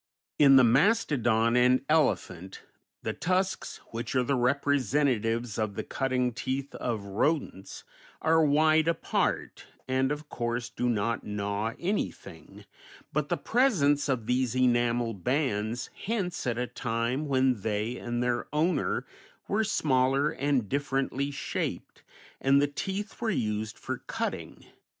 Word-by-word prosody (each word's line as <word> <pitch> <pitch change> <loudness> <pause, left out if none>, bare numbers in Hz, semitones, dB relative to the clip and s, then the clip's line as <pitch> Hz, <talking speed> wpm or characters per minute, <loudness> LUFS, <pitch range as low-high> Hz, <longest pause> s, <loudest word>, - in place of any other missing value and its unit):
In 140 -2 +7
the 130 - +8
mastodon 120 - +3
and 125 +2 +4
elephant 95 - 0 0.4
the - - -2
tusks, 185 +2 -1
which 115 +3 -4
are 130 - +3
the 140 - 0
representatives 125 -4 +1
of 105 -2 -1
the - - -3
cutting 130 -2 -1
teeth 135 +3 -3
of 115 -4 -3
rodents, 100 0 -2 0.4
are 160 0 +3
wide 155 +2 +4
apart, 170 -1 -1 0.2
and 130 +1 +1
of 150 0 -4
course 120 -1 -3
do 125 +1 -1
not 115 0 -1
gnaw 105 +2 -2
anything, 195 +4 -4 0.5
but - - -1
the - - +1
presence 155 - +2
of 125 -5 0
these 125 0 0
enamel 120 -2 +2
bands 120 - -1
hints 195 - -3
at 120 -1 0
a 125 - 0
time 125 +4 -2
when 130 -5 +2
they 110 +3 -2
and 120 0 -2
their 120 -1 -1
owner 160 +5 0 0.4
were 215 +2 +1
smaller 135 -7 +2
and 135 -5 0
differently 135 +1 -1
shaped, 135 -2 -4 0.4
and 135 +1 +4
the 145 - +4
teeth 195 +10 -5
were 230 - 0
used 110 - -2
for - - -5
cutting. - - -5
130 Hz, 130 wpm, -28 LUFS, 115-145 Hz, 0.5 s, the